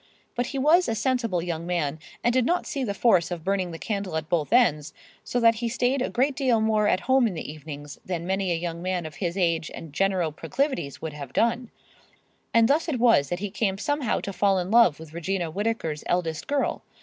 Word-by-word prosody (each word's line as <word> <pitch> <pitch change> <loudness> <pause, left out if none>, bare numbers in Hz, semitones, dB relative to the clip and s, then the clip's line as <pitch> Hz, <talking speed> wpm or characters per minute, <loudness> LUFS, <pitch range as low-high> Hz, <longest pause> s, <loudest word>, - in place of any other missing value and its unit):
But 245 0 -1
he 275 - -4
was 315 +7 +4
a 225 - 0
sensible 230 -6 0
young 170 -1 -4
man 160 -4 -1 0.2
and 240 +1 +2
did 255 0 +3
not 350 +8 0
see 275 - -3
the 200 -5 -2
force 190 -7 +3
of 175 -3 -5
burning 190 -1 0
the 165 - -7
candle 200 -4 -3
at 155 0 -5
both 170 -2 0
ends, 160 - +3 0.3
so 245 - -1
that 230 -1 +6
he 235 - 0
stayed 245 +3 0
a - - 0
great 265 +3 +1
deal 255 -5 +2
more 215 -1 +2
at 185 - +2
home 260 -1 +3
in 195 - -4
the 160 - -4
[Pg 155 +1 -8
112]evenings 145 -2 -8
than 175 -2 -4
many 190 0 0
a - - +2
young 170 0 -4
man 180 -2 -2
of 155 -2 -8
his 175 -1 -2
age 165 -4 +1
and 160 -3 -9
general 185 -1 +1
proclivities 260 - -2
would 160 -2 -4
have 140 -3 -8
done; 235 +1 +1 0.8
and 230 -1 +5
thus 310 +5 +2
it 265 -6 -1
was 230 - +4
that 175 - -1
he 205 -2 -3
came 195 -2 -1
somehow 290 +2 0
to 200 - -5
fall 195 0 +2
in 180 +1 -2
love 230 -10 +5
with 160 -1 -11
Regina 170 0 -2
Whittaker's 195 -6 -2
eldest 165 -3 -1
girl. 285 -1 0
195 Hz, 230 wpm, -25 LUFS, 165-240 Hz, 0.8 s, that